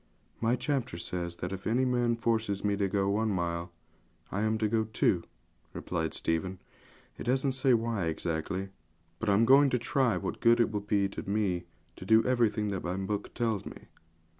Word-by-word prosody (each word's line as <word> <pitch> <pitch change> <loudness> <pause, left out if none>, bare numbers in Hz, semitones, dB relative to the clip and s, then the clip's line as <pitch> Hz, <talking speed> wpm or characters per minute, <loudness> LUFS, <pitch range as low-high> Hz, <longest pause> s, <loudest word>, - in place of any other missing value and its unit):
'My 115 +2 +2
chapter 130 - -2
says 85 0 -4
that 90 +1 -5
if 95 0 -5
any 125 +4 +2
man 120 -2 +1
forces 110 -3 -1
me 100 -1 +1
to 100 -1 0
go 95 0 0
one 110 +3 +1
mile, 85 -2 -2 0.6
I 100 - -1
am 110 0 +1
to 110 0 +1
go 110 +1 +1
two,' 105 -5 +1 0.5
replied 80 -3 -3
Stephen; 90 +3 -1 0.6
'it - - -6
doesn't 130 +2 +1
say 130 -1 +3
why 115 -5 -1
exactly, 85 +4 -2 0.5
but 110 - -1
I'm 100 +3 +4
going 140 +3 +6
to 125 - +1
try 125 0 +1
what - - -4
good 120 0 +5
it 115 - +3
will 105 - -1
be 100 -1 +1
to 100 - -7
me 95 -4 0 0.3
to - - -9
do 110 +4 +4
everything 115 -4 +1
that 95 -2 -3
my 90 +1 -2
book 100 +1 -3
tells 115 -4 0
me.' - - -11
105 Hz, 190 wpm, -30 LUFS, 95-115 Hz, 0.6 s, going